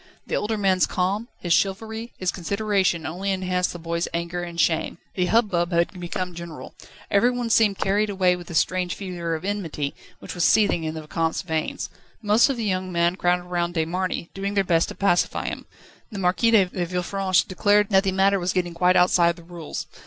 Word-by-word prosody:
The - - -2
older 215 +1 -1
man's 190 -3 +2
calm, 195 +5 -1
his 175 -2 0
chivalry, 220 +5 -1
his 185 -1 -1
consideration 195 -2 0
only 185 +5 -3
enhanced 185 -1 0
the - - -7
boy's 170 0 -2
anger 170 +1 -3
and 170 -1 -6
shame. 165 0 +1 0.2
The 180 -1 0
hubbub 185 -5 +2
had 170 +2 0
become 180 +1 -4
general. 170 -2 -9 0.4
Everyone 240 +3 +2
seemed 210 -4 +4
carried 205 +2 +1
away 185 -2 +2
with 175 -1 -10
this 170 - -2
strange 180 0 0
fever 175 -4 -4
of 160 +3 -6
enmity, 165 -8 -3 0.2
which - - -8
was 175 - -1
seething 175 0 +3
in 155 0 -3
the 160 - -5
Vicomte's 165 +3 -1
veins. 160 -3 -3 0.3
Most 215 +4 +4
of 270 - -1
the 230 - -2
young 185 -2 -1
men 170 0 +2
crowded 180 -1 +1
round 175 0 -2
De 160 -1 +1
Marny, 180 0 -3
doing 200 +1 -3
their 195 - +3
best 170 -3 +2
to - - -7
pacify 195 -3 +1
him. - - -5 0.4
The 205 - -6
Marquis 190 +5 +2
de 215 -4 +5
Villefranche 180 +1 0
declared 205 +2 +2
that 190 0 +5
the 195 - +1
matter 195 +1 +3
was 180 +1 -1
getting 175 -2 -1
quite 180 +2 +3
outside 175 -1 +4
the 170 - -14
rules. 170 -2 -7
180 Hz, 195 wpm, -24 LUFS, 170-200 Hz, 0.4 s, de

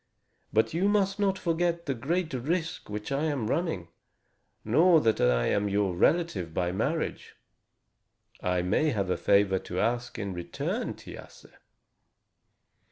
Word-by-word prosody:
But 110 +5 +2
you 185 +5 +2
must 195 -1 +1
not 195 -1 +2
forget 170 0 0
the 140 - 0
great 160 +6 -2
risk 160 +6 -2
which 105 +4 -5
I 140 +3 0
am 145 -7 -1
running, 110 - -2 0.8
nor 160 +9 +5
that 115 -6 +1
I - - +3
am 100 0 +1
your 100 -2 0
relative 95 - +1
by 90 -1 0
marriage. 140 - -2 1.1
I 90 -1 0
may 110 - +2
have 100 -8 -1
a - - +2
favor 100 -1 +3
to 90 0 -5
ask 120 +2 -1
in 100 -3 -4
return, 85 -1 -3
Thiasse." - - -12
120 Hz, 140 wpm, -28 LUFS, -, 1.1 s, nor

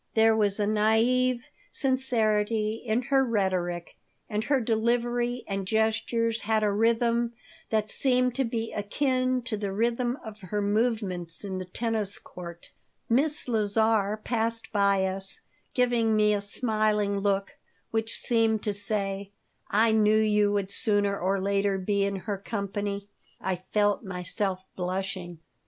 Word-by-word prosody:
There 225 0 +5
was 205 -2 +1
a 205 - +2
naive 230 +4 +2 0.3
sincerity 225 -5 +1
in 235 +1 0
her 270 +2 +3
rhetoric, 185 -7 -1 0.3
and 210 0 -2
her 280 -2 +2
delivery 240 +1 0
and 195 -1 -3
gestures 225 +1 0
had 220 0 +1
a 210 - +2
rhythm 235 +2 +2 0.4
that 215 -1 +1
seemed 250 +1 +2
to 270 +2 0
be 230 -2 -3
akin 255 +4 0
to 245 -3 -2
the 200 -1 -3
rhythm 240 +4 0
of 215 -1 -9
her 205 +2 -3
movements 205 -5 0
in 190 -1 -4
the 185 - -5
tennis 215 +1 -2
court 170 -1 -10 0.4
Miss 290 +6 +2
Lazar 215 -2 +2
passed 230 -1 -1
by 200 -2 +3
us, 190 +1 -2 0.3
giving 240 -3 +2
me 210 0 +4
a 205 - 0
smiling 210 -1 +1
look, 195 0 -1 0.3
which 225 0 -1
seemed 225 -2 +1
to 210 - 0
say, 200 -1 0 0.4
"I 220 +2 +3
knew 215 0 +4
you 210 -1 +3
would 200 -1 -1
sooner 205 -3 +1
or 195 +2 0
later 200 0 +1
be 200 +1 0
in 200 0 -1
her 195 +1 -4
company." 200 0 -4 0.3
I 190 -1 -2
felt 205 0 +2
myself 185 0 -2
blushing. 180 -2 -4
215 Hz, 140 wpm, -27 LUFS, 200-230 Hz, 0.4 s, There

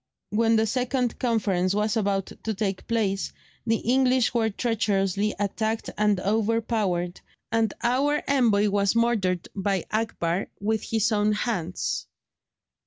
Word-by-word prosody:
When 225 +2 +3
the 220 0 +3
second 250 +1 -1
conference 200 -6 +1
was 210 +2 +1
about 200 -3 0
to 220 -1 -1
take 195 -2 -3
place, 205 -4 0 0.4
the 225 - +3
English 255 +1 +2
were 225 -2 +2
treacherously 205 -2 0
attacked 220 +2 -2
and 210 -2 +2
overpowered, 210 -4 0 0.3
and 225 -2 +2
our 275 +5 +2
envoy 225 -7 +3
was 200 +1 +1
murdered 210 -7 +1
by 195 -2 -1
Akbar 205 -5 -1
with 215 +1 0
his 225 0 0
own 210 0 +2
hands. 210 +1 -2
215 Hz, 125 wpm, -25 LUFS, 195-230 Hz, 0.4 s, When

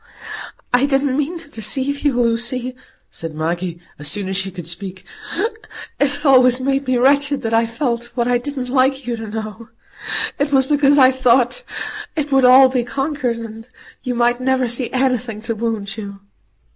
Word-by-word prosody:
"I 250 +3 +4
didn't 275 -1 +1
mean 300 +5 -1
to 330 - -12
deceive 265 +5 0
you, 290 -2 +1
Lucy," 240 +2 +1 0.4
said 165 -2 -7
Maggie, 170 +2 -3 0.2
as 145 - -3
soon 195 +6 -2
as 190 - -3
she 195 0 -1
could 175 -3 -9
speak. 185 +2 -7 0.9
"It 285 +1 0
always 255 -2 +6
made 270 +1 -1
me 255 -1 +2
wretched 280 +2 +3
that 225 0 -2
I 225 0 +3
felt 235 0 -2
what 240 -1 0
I 245 -1 +2
didn't 260 -1 -5
like 265 +1 +1
you 240 -1 -2
to 225 -1 -7
know. 220 +1 -7 0.7
It 285 +1 0
was 265 -2 +4
because 285 0 +3
I 260 -2 +7
thought 255 - +2 0.5
it 300 -2 -2
would 270 -1 +4
all 260 +1 +8
be 255 -2 0
conquered, 270 -2 -2
and 225 +1 -9 0.3
you 250 -1 -3
might 240 +1 +1
never 260 -1 +1
see 240 +1 +1
anything 250 -4 0
to 230 - -2
wound 220 -2 -3
you." 200 -2 -7
250 Hz, 175 wpm, -19 LUFS, 225-270 Hz, 0.9 s, all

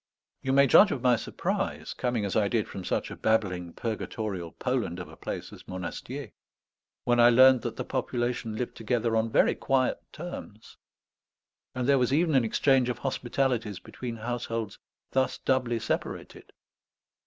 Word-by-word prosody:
You 130 - -1
may 140 +1 +6
judge 200 - +7
of 130 -8 -3
my 125 -1 +5
surprise, - - -3
coming 120 -4 -1
as 100 - -3
I 105 -2 +3
did 110 0 0
from 95 - -7
such - - -2
a - - -6
babbling 95 -6 0
purgatorial 105 -6 -4
Poland 125 -9 -2
of 90 -3 -6
a 80 - -13
place - - -6
as - - -13
Monastier, 105 +8 -6 0.7
when 120 0 +2
I 120 0 +8
learned 130 +1 +7
that - - -4
the - - -3
population 120 -2 -2
lived 125 +2 -4
together 115 0 0
on 110 0 +1
very - - +4
quiet 130 -2 +1
terms; 150 -10 -9 1.0
and 125 -1 -1
there 140 -1 +5
was 125 0 +1
even 160 +3 +2
an 130 -3 +4
exchange 130 +2 +3
of 125 - -2
hospitalities 125 -5 -1
between 120 +5 -7
households 115 -2 -4 0.3
thus 130 0 +1
doubly 125 -3 +1
separated. 115 - -4
120 Hz, 160 wpm, -28 LUFS, 110-130 Hz, 1.0 s, I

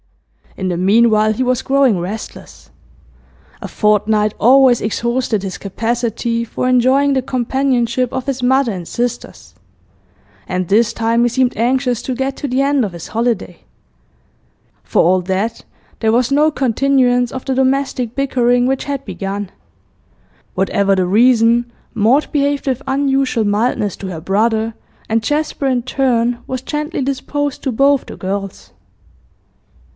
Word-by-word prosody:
In 190 - -3
the 175 -2 -1
meanwhile 215 +3 +3
he 220 +4 -1
was 255 0 0
growing 270 -8 +2
restless. 195 +6 -8 0.9
A - - -5
fortnight 210 0 +1
always 255 0 +5
exhausted 235 -1 -1
his 190 -2 -5
capacity 230 +2 -2
for 235 +2 -3
enjoying 260 +3 +3
the 265 - +1
companionship 255 -1 0
of 260 - -4
his 265 -2 -3
mother 260 -1 +2
and 180 -2 -6
sisters, 240 0 -5 0.9
and 185 -1 -2
this 215 +4 +3
time 230 0 0
he 240 - +3
seemed 250 +1 0
anxious 250 +1 0
to 260 - -4
get 265 +1 -2
to 285 - -4
the 255 +2 +1
end 280 -1 +2
of 205 - -3
his 170 - -9
holiday. 225 -6 -2 1.2
For - - +1
all 180 +2 +3
that, 195 +5 -2 0.4
there 220 -1 +1
was 245 +3 +1
no 300 +2 +4
continuance 250 -2 +1
of 260 - -7
the 265 - -1
domestic 260 -2 0
bickering 245 -3 +1
which 265 +1 -1
had 280 -1 -4
begun. 195 0 -5 1.0
Whatever 195 +1 +1
the 185 -1 +1
reason, 235 +3 +3 0.2
Maud 240 +6 +2
behaved 285 -1 0
with 260 -1 -1
unusual 270 -4 +1
mildness 205 -1 0
to 195 - -7
her 175 -4 -6
brother, 220 +4 0 0.3
and 225 0 0
Jasper 295 0 -1
in 250 -2 0
turn 245 -2 0
was 260 -1 -4
gently 300 +3 -3
disposed 280 +2 -3
to 265 - -1
both 275 +3 +2
the - - -9
girls. 195 +1 -5
240 Hz, 145 wpm, -17 LUFS, 215-265 Hz, 1.2 s, always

